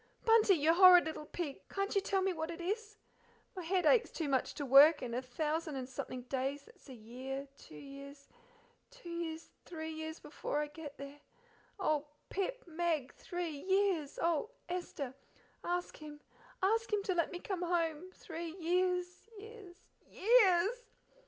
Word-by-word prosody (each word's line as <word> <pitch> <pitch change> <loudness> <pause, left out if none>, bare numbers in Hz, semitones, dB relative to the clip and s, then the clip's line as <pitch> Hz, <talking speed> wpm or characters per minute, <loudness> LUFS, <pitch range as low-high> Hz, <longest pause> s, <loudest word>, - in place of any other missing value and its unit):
Bunty, 450 -4 +6
you 315 +1 +3
horrid 360 -1 +8
little 315 -1 -5
pig, 315 -6 -4
can't 395 +1 -2
you, 400 - +3
tell 385 -1 0
me 380 -1 +1
what 320 -1 -4
it 340 0 -6
is? 425 +4 -3 0.6
My 370 - -4
head 360 +1 0
aches 470 +6 +5
too 320 - -3
much 265 -2 0
to 290 - -4
work, 285 +3 +7
and 240 -2 -4
a 245 - -1
thousand 305 +4 -2
and 260 -2 -4
something 255 -1 -6
days 270 +2 -2
that's 285 - -19
a 260 - -8
year 260 +5 -6
two - - -14
years 275 - -11 0.6
two - - -11
years 330 -1 -5
three 320 -2 -6
years 315 0 -6
before 295 - -4
I 300 - 0
get 295 -2 -9
there. 280 +1 -9 0.6
Oh, 305 -5 0 0.2
Pip, - - -2
Meg, 325 -5 -1
three 350 -2 -4
years! 380 -6 +1
oh, 335 +4 +1 0.2
Esther! 345 -7 -4 0.5
ask 355 0 -2
him, 300 -1 -10 0.4
ask 450 +4 +2
him 415 -1 +1
to 385 - 0
let 335 -2 0
me 355 - -4
come 365 0 -4
home! 340 -1 -1
Three 330 -1 -7
years 360 +3 0
years 420 -4 -11 0.3
years!" 415 -1 +4
335 Hz, 165 wpm, -34 LUFS, 290-370 Hz, 0.6 s, horrid